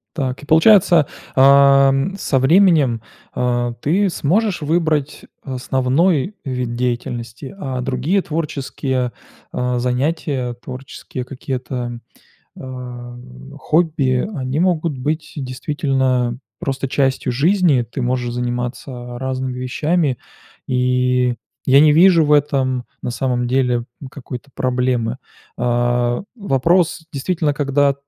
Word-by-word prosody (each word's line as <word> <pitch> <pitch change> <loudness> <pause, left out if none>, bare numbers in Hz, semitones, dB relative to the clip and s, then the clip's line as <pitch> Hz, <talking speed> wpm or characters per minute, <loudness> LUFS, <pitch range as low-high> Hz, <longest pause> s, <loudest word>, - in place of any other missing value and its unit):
Так 135 -4 -3
и 145 - -11
получается, 170 -1 +5 0.3
ам, 140 +4 +5
со 140 -8 0
временем, 145 - +4 0.3
а, 120 -1 0
ты 190 +9 +2
сможешь 185 +3 0
выбрать 155 -2 0 0.2
основной 135 +7 0
вид 125 -3 -3
деятельности, 120 0 -3
а 130 -6 -3
другие 135 +10 0
творческие, 140 -5 -2 0.4
а, 125 0 -1
занятия, 130 0 -1
творческие 130 0 -7
какие-то, 125 -2 -5 0.6
а, 125 -2 -8 0.4
хобби, 150 -5 +1
они 135 +2 -2
могут 165 -6 0
быть 155 +4 -3
действительно 130 -2 -1 0.2
просто 135 0 -3
частью 130 -2 0
жизни. 160 -1 +3
Ты 120 +3 -6
можешь 120 -1 -1
заниматься 120 0 -4
разными 130 0 -3
вещами, 140 +2 0 0.5
и 125 -1 +1 0.3
я 135 +1 +6
не 150 0 +6
вижу 170 0 +6
в 150 - +2
этом, 130 -4 +1 0.2
на 125 - -3
самом 125 0 -1
деле, 125 -2 +1 0.3
какой-то 135 0 -9
проблемы. 125 -2 0 0.4
А, 120 +1 0
вопрос, 170 - +1
действительно, 150 +1 -1
когда 140 -1 +2
130 Hz, 105 wpm, -19 LUFS, 125-150 Hz, 0.6 s, я